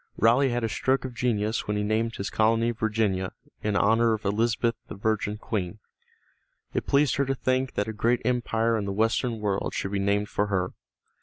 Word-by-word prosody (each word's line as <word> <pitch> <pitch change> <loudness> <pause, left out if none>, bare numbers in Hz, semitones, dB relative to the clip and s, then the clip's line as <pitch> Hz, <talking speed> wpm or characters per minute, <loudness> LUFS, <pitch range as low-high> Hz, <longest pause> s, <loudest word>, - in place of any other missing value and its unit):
Raleigh 120 +5 +4
had 120 -1 -1
a - - +2
stroke 130 +4 0
of 130 - -5
genius 110 -2 -1
when 105 0 0
he 105 - 0
named 110 +2 0
his 100 - -4
colony 115 +2 +2
Virginia, 110 -4 -1 0.3
in 105 -1 -1
honor 115 +3 +4
of 110 -1 -4
Elizabeth 115 +3 +1
the - - -7
Virgin 105 0 -1
Queen. 105 -3 -3 1.0
It - - -2
pleased 140 -2 +3
her 140 - +2
to 135 - 0
think 130 0 0
that 100 - 0
a 110 - -3
great 115 +3 +1
empire 115 -2 +1
in 100 - -3
the 100 - -2
western 115 +2 +1
world 100 -2 -1
should 95 - -2
be 100 - 0
named 100 +1 +1
for 105 -1 -1
her. 95 -3 -1
110 Hz, 200 wpm, -26 LUFS, 105-120 Hz, 1.0 s, Raleigh